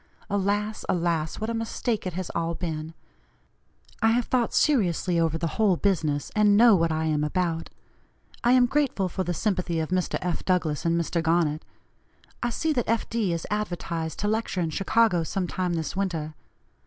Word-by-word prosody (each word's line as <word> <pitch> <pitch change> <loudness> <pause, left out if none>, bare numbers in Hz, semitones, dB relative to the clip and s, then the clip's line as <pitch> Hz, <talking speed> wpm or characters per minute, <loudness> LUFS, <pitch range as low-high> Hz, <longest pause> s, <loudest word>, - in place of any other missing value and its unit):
Alas! 205 +2 0
alas! 165 -3 0
what 220 - -2
a - - -2
mistake 225 -1 -2
it 180 - -4
has 185 0 -4
all 170 0 -2
been! 160 -2 -5 1.1
I 225 - +4
have 240 0 +1
thought 245 -3 +1
seriously 180 - +2
over 165 -1 +1
the 165 - -2 0.2
whole 195 -5 +4
business, 155 -8 0
and 210 -1 +5
know 230 -1 +7
what 165 -2 +2
I 160 0 -1
am 150 -1 +1
about. 165 +1 -1 0.7
I 240 +1 +5
am 250 -1 +6
grateful 265 -7 0
for 185 - -2
the 175 -1 -2
sympathy 180 -5 -1
of 160 - -2
Mr. 185 0 0
F. 180 -2 -3
Douglass 170 -6 0
and 170 0 +2
Mr. 170 0 -1
Garnet. 165 -2 +1 0.8
I 240 - 0
see 315 +7 0
that 245 -6 -1
F. 230 0 +1
D. 225 -5 0
is 170 -1 -3
advertised 170 -6 -3
to 205 - 0
lecture 220 -3 -1
in 165 -2 -1
Chicago 195 +1 +2
some 180 +3 -2
time 180 0 -2
this 160 -1 -3
winter. 165 -6 -2
180 Hz, 180 wpm, -26 LUFS, 165-210 Hz, 1.1 s, know